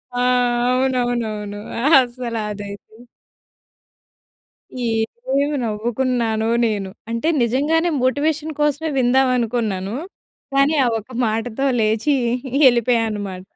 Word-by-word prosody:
ఆ! - - -1 0.5
అవునవునవును. 240 -5 -1 0.4
అసల 245 -2 -1 0.2
అదైతే. 205 +1 -9 2.5
ఏమి 290 0 -1
నవ్వుకున్నానో 230 0 -1 0.2
నేను. 205 -3 -2 0.2
అంటే 230 +6 -2 0.2
నిజంగానే 295 +8 +1
మోటివేషన్ 300 +4 0
కోసమే 295 +2 0
విందాం 260 +1 +3
అనుకున్నాను. 220 -4 -2 0.6
కానీ 275 +3 +3
ఆ - - +2
ఒక్క 220 +4 -15
మాటతో 225 +4 -2
లేచి 220 +6 +1 0.5
ఎళ్ళిపోయా 240 -1 +3
అన్నమాట. 200 -3 -5
240 Hz, 90 wpm, -20 LUFS, 215-265 Hz, 2.5 s, విందాం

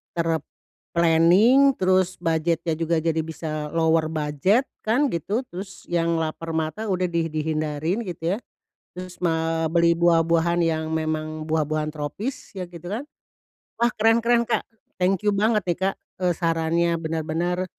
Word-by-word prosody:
ter-planning 170 - +2
terus 185 0 +2
budgetnya 165 0 0
juga 165 -1 0
jadi 165 -1 +1
bisa 155 -1 -5
lower 160 -1 +3
budget 155 - +1 0.2
kan 250 +5 +1
gitu 200 - -1
terus 190 +2 -8
yang 170 -1 +1
lapar 160 0 -3
mata 160 +8 -2
udah 185 -2 0
di 165 -1 0
dihindarin 155 +3 -2
gitu 175 +1 -2
ya, - - -5 0.6
terus 180 0 -8
ma 165 -1 0
beli 170 +1 +3
buah-buahan 170 0 +3
yang 160 -1 0
memang 155 0 -3
buah-buahan 155 -1 0
tropis 155 - -5
ya 185 - -4
gitu 170 0 -11
kan, 245 - -3 0.8
wah 235 +1 +2
keren 225 +2 +3
keren, 240 0 +4
Kak, 235 0 -1 0.3
thank 185 0 +1
you 210 - +2
banget 210 +1 +2
nih, 170 - +1
Kak, 195 - 0 0.3
eee, 180 -1 +2
sarannya 165 0 +1
bener-bener, 165 +3 -2
170 Hz, 140 wpm, -24 LUFS, 160-185 Hz, 0.8 s, keren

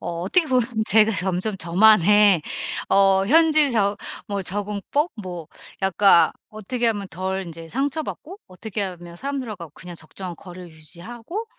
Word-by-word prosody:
어 170 -1 -5
어떻게 320 - +3
보면 255 -2 +2 0.2
제가 220 +2 +4
점점 190 +2 -2
저만의 200 +1 +5 0.5
어 195 -1 +4
현지 310 +1 +4
저 205 -2 +1 0.3
뭐 200 -1 -3
적응법 205 - -2
뭐 175 -4 -7 0.4
약간 190 -3 +4 0.2
어떻게 230 +3 -3
하면 205 -3 -2
덜 190 +2 -4
인제 165 -1 -10
상처받고 290 - -4
어떻게 205 +3 -6
하면 175 -2 -7
사람들하고 225 - -6
그냥 175 -1 -10
적정한 175 +2 -9
거리를 180 -1 -11
유지하고 225 - -9
195 Hz, 300 characters per minute, -22 LUFS, 180-230 Hz, 0.5 s, 저만의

